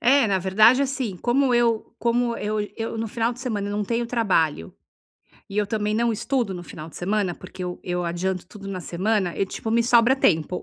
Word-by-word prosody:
É, 260 +1 +5
na 195 -2 +1
verdade, 215 +8 +5
assim, 260 -8 -2
como 250 +5 +2
eu 235 -2 +1
como 235 0 +1
eu 210 0 -2 0.2
eu 225 0 -4
no 225 0 -3
final 230 +2 0
de 245 - -11
semana, 210 -6 -2
eu 205 - -3
não 210 - -1
tenho 235 +2 -1
trabalho 180 - 0 0.8
e 200 - -3
eu 205 - +2
também 210 0 -1
não 235 +1 +2
estudo 235 -2 -1
no 175 - -6
final 155 -2 -9
de - - -13
semana, 195 -1 0
porque 185 0 -10
eu 180 0 -4
eu 180 -1 -2
adianto 175 +1 -2
tudo 195 +1 -11
na 185 -2 -4
semana 185 +1 -1
e, - - +1
tipo, 220 - -5
me 235 +1 +3
sobra 240 +2 +4
tempo 170 - +1
210 Hz, 215 wpm, -24 LUFS, 185-235 Hz, 0.8 s, É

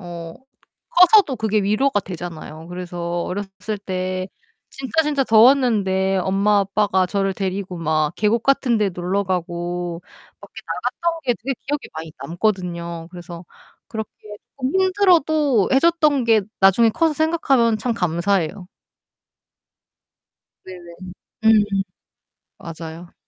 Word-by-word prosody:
어 170 -2 -8 0.6
커서도 360 -5 +5
그게 215 -2 0
위로가 215 +4 +1
되잖아요. 165 -3 -8
그래서 175 -1 -4
어렸을 200 +2 -5
때 185 -1 -3 0.4
진짜, 275 +5 -1
진짜 295 -3 0
더웠는데 220 -6 +4
엄마 195 +3 +2
아빠가 195 -1 +1
저를 195 +1 -1
데리고 190 -2 -4
막 155 -1 0
계곡 220 +2 +1
같은 265 -3 +2
데 210 -2 +1
놀러가고 175 -1 -3 0.4
밖에 - - -15
나갔던 340 -1 -2
게 245 - +2
되게 270 +3 -2
기억에 290 +2 -1 0.2
많이 160 0 -7
남거든요. 170 -1 -3
그래서 175 -1 -10 0.4
그렇게 220 -2 -5 0.5
쪼끔 270 +9 0
힘들어도 315 - +3
해 265 - +6
줬던 305 -5 +3
게 225 -2 +4 0.2
나중에 195 +4 +5
커서 320 +6 +1
생각하면 275 -8 +2
참 235 +2 -1
감사해요. 180 0 -1 2.0
네네. 175 -2 -11 0.5
음음. 220 -1 +6 0.9
맞아요. 165 +1 -9
195 Hz, 265 characters per minute, -21 LUFS, 175-245 Hz, 2.0 s, 해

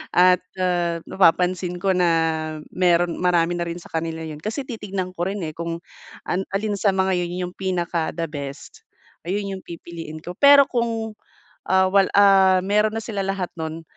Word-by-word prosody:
at, 180 0 +5 0.2
ah, 175 -2 0
napapansin 180 0 +2
ko 195 +2 +1
na 180 -1 +3 0.6
meron 175 -1 +2
marami 175 -1 +2
na 170 - -2
rin 170 - -5
sa - - -15
kanila 160 0 -3
yun. 155 -2 -7
Kasi 220 - -3
titignan 195 -5 -4
ko 175 +1 -2
rin, 200 -2 -4
eh, 155 - -5
kung 170 0 -4 0.5
an 180 - -1
alin 210 +1 -1
sa 200 - +3
mga 190 0 +2
yun 175 +1 -3
yung - - -17
pinaka 175 -3 -1
the 165 0 -2
best, 145 - -8 0.5
ayun 200 +2 -1
'yung 190 - -9
pipiliin 165 -2 -8
ko. 175 - -6
Pero 280 0 +8
kung, 230 -2 -1 0.5
ah, 190 0 +3
wal 195 0 +4
ah, 195 -2 +6
meron 210 +2 +1
na 225 - -3
sila 205 -4 -3
lahat 195 -2 -2
nun, 160 0 -5
180 Hz, 175 wpm, -22 LUFS, 170-195 Hz, 0.6 s, Pero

